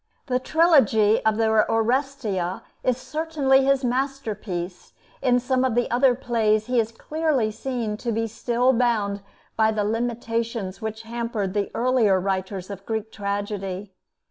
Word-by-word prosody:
The 250 -1 0
trilogy 255 - +4
of 220 -1 +3
the 225 - +2
'Oresteia' 220 -3 0 0.2
is 255 -2 +1
certainly 285 -2 +1
his 275 0 +2
masterpiece; 230 -9 -3 0.3
in 250 -2 +3
some 255 +1 0
of 255 -3 +1
the 245 -1 +1
other 250 +1 +4
plays 220 -4 +1
he 250 0 +1
is 225 0 0
clearly 290 -2 -1
seen 230 -3 -3
to 235 +1 -3
be 225 +1 0
still 240 +3 +1
bound 220 -5 +1 0.3
by 220 0 +3
the 215 -1 0
limitations 230 -2 -2
which 220 0 -5
hampered 230 -4 -3
the 205 -1 -1
earlier 235 -6 +3
writers 190 0 -3
of 195 -1 -8
Greek 220 -1 -3
tragedy. 200 -1 -4
225 Hz, 145 wpm, -24 LUFS, 210-255 Hz, 0.3 s, trilogy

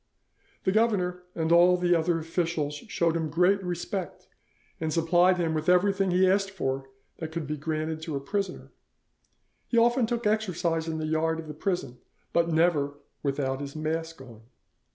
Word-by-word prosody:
The 190 - +2
governor 190 -5 +1
and 160 0 -1
all 175 +1 +6
the 175 0 +2
other 165 0 +2
officials 165 -2 -2
showed 165 +2 -1
him 160 -2 -1
great 180 +5 +3
respect, 180 +1 -4 0.5
and 160 -1 -2
supplied 175 +3 +3
him 165 -2 0
with 155 +2 -1
everything 195 +1 +3
he 185 +1 +4
asked 195 +1 +2
for 135 -8 -3 0.3
that 160 -1 -5
could 165 -1 -4
be 150 +2 -3
granted 155 +1 -3
to 160 -2 -4
a - - -1
prisoner. 195 +6 -4 1.0
He 235 - 0
often 240 +1 +4
took 235 -1 -2
exercise 180 -6 0
in 160 -1 -2
the 155 - -3
yard 160 +1 0
of 160 - -7
the 150 - -6
prison, 150 -7 -3 0.3
but 170 0 +2
never 155 -4 +2 0.2
without 135 -1 -1
his 140 0 -7
mask 160 0 -3
on. 120 -4 -13
165 Hz, 170 wpm, -27 LUFS, 155-180 Hz, 1.0 s, all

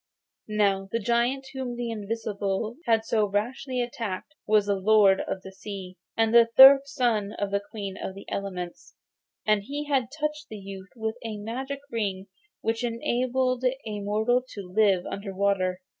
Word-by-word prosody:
Now 200 -2 +1
the 230 - +1
giant 240 +4 +1
whom 260 -2 -4
the 240 -1 -3
invisible 215 0 -3
had 225 -1 +3
so 215 -2 +2
rashly 245 +5 -1
attacked 230 +1 -5
was 215 -1 +4
the 205 - +1
Lord 195 0 +5
of 190 - -4
the 190 - -9
Sea, 190 -1 -8 0.2
and 225 0 +2
the 235 -1 +7
third 275 +1 +10
son 235 -7 0
of 205 -3 -3
the 200 - +2
Queen 200 -3 -5
of 190 - -5
the 195 - -10
Elements, 180 -3 -5 0.5
and 215 -1 +3
he 285 +8 -5
had 270 -5 +1
touched 300 0 -3
the 215 - -7
youth 195 -1 -9
with 220 0 -3
a 220 -2 -4
magic 260 +6 -5
ring 195 -4 -2 0.4
which 225 +2 -1
enabled 250 +2 0
a 250 -5 -1
mortal 215 +5 +1
to 185 -3 -8
live 200 -4 +4
under 195 -1 -5
water. 190 -2 +1
220 Hz, 165 wpm, -27 LUFS, 200-245 Hz, 0.5 s, third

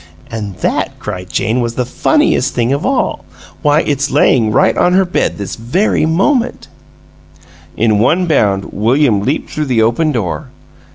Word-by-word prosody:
An' 105 -3 -5
that," - - -1
cried 90 0 -6
Jane 115 +6 0
"that's 120 -1 -3
the 125 - -1
funniest 295 - +1
thing 120 +2 +1
of 140 - -1
all! 270 - -1 0.4
Why, 150 0 +3
it's 140 -2 -1
layin' 125 -5 +3
right - - +3
on 180 - +2
her 190 +1 +3
bed 175 - -1
this 100 -2 -5
very 155 - 0
minute!" 235 - 0 1.1
In 110 -2 +2
one 160 - +2
bound 100 - 0
William 115 0 +2
leaped 135 +9 -2
through 150 - -2
the 120 -4 +2
open 120 +8 +1
door. 110 - -3
130 Hz, 160 wpm, -14 LUFS, 110-160 Hz, 1.1 s, Why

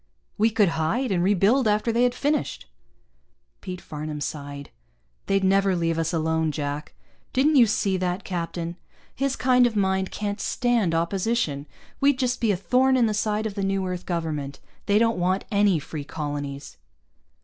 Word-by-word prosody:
"We 220 +2 +3
could 210 -4 +3
hide, 165 +11 -1
and 175 -2 +1
rebuild 205 +6 +3
after 210 +2 +2
they 235 +1 +1
had 245 0 +2
finished." 290 +2 -1 1.0
Pete 180 -1 -6
Farnam 150 0 -6
sighed. 140 -1 -6 0.6
"They'd 195 0 +2
never 195 0 +3
leave 165 -1 0
us 165 0 0
alone, 160 -1 0
Jack. 145 0 -4 0.4
Didn't 290 +4 +3
you 240 -3 +7
see 195 -2 +1
that 180 0 -2
captain? 170 -1 -4 0.4
His 275 0 -1
kind 250 -1 +4
of 230 - -5
mind 190 -1 +1
can't 205 0 -4
stand 235 -9 +1
opposition. 170 -4 -1 0.3
We'd 280 -1 +3
just 250 -1 -1
be 225 -3 +3
a 190 - 0
thorn 255 +9 +3
in 245 - +4
the 215 - 0
side 215 +1 -1
of 215 - -2
the 200 - -4
new 195 0 0
Earth 180 -1 -5
Government. 155 -5 -3 0.3
They 205 - +4
don't 230 -2 +2
want 185 +2 0
any 200 -3 +3
free 150 0 -6
colonies." 145 - -5
190 Hz, 170 wpm, -25 LUFS, 165-225 Hz, 1.0 s, you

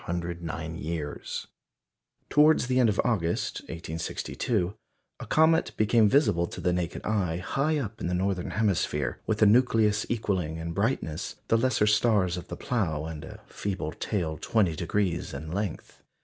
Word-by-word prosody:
Towards 150 -2 +5
the 130 0 +1
end 120 -3 +5
of 100 - -1
August, 85 -9 0
1862, 85 +4 -2 0.5
a - - -6
comet 160 +1 +3
became 110 0 +4
visible 105 - +3
to - - -8
the 90 - +1
naked 90 -1 -3
eye 95 -6 0
high 140 - 0
up 110 -6 -4
in - - -1
the 90 - 0
northern 95 0 -1
hemisphere, 90 -6 0
with 110 -1 +2
a - - +8
nucleus 110 -2 +4
equalling 95 -8 -1
in 80 +1 -4
brightness 90 - -1
the - - +5
lesser 120 -3 +2
stars 105 -4 +3
of 90 - -7
the - - -6
Plough 80 -11 -1
and 80 -2 -6
a - - -10
feeble 95 -6 -4
tail 80 -6 -2
20° 90 -3 0
in 80 +3 -6
length. 100 -1 -4
100 Hz, 145 wpm, -28 LUFS, 85-115 Hz, 0.5 s, a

